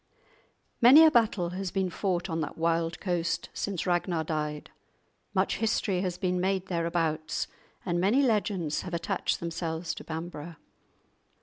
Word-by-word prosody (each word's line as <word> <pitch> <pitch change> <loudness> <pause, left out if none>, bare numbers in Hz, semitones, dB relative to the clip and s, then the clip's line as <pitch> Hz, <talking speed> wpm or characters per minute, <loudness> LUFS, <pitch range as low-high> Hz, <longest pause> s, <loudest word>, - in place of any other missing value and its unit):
Many 265 +7 +9
a 315 - +6
battle 215 - +2
has 185 +1 -4
been 190 0 -1
fought 180 -1 -1
on 165 -2 -2
that 150 - -5
wild 165 0 0
coast 175 -3 -1
since 195 -4 -3
Ragnar 175 -2 0
died; 150 -1 -3 0.6
much - - +1
history 210 -4 0
has 180 -2 -2
been 180 -1 0
made 190 0 0
thereabouts, 165 -2 -1 0.4
and 175 -1 0
many 225 +9 +3
legends 205 - 0
have 180 -2 -5
attached 170 - -1
themselves 165 0 -3
to - - -9
Bamburgh. 165 0 -6
175 Hz, 140 wpm, -28 LUFS, 165-190 Hz, 0.6 s, Many